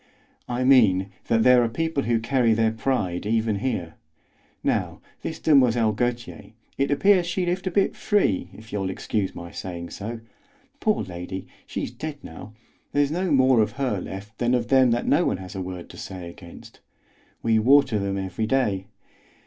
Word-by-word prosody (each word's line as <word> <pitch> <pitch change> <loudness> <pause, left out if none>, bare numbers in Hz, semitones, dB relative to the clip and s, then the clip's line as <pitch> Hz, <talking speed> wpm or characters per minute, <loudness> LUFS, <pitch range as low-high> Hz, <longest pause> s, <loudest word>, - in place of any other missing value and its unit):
"I 125 +1 -1
mean 100 -8 +4 0.2
that 115 -1 +3
there 125 -1 +6
are 115 - 0
people 160 +2 -1
who 115 -1 +2
carry 115 -1 +2
their 110 0 +2
pride 110 -6 -1
even 110 -1 +1
here. 100 -8 -3 0.7
Now, - - -1 0.2
this 160 - -4
Demoiselle 125 -8 +4
Gautier, 120 +1 -3 0.2
it 140 0 0
appears 180 +4 +4
she 180 +1 -1
lived 180 +2 -2
a - - +3
bit 195 +2 +1
free, 100 - +1
if 110 +1 -14
you'll 95 -2 -1
excuse 95 +1 -2
my 85 0 -8
saying 85 -2 -6
so. 115 +3 -6 0.6
Poor 215 -2 +1
lady, 90 +1 -6 0.2
she's - - -4
dead 155 -2 -6
now; 100 +7 -10 0.4
there's 145 0 +2
no 180 +3 -1
more 130 -3 +5
of 105 - 0
her 130 -8 -1
left 100 +5 -8
than 120 +1 +2
of 120 -1 -2
them 130 -2 +5
that 120 +1 0
no 155 +5 +3
one - - 0
has 95 -1 -9
a 95 - -4
word 90 -1 -6
to - - -13
say 90 -2 -7
against. 85 0 -13 0.6
We 115 -1 +3
water 130 -1 +4
them 100 0 -2
every 95 +3 -3
day. 105 -7 0
115 Hz, 175 wpm, -24 LUFS, 95-135 Hz, 0.7 s, there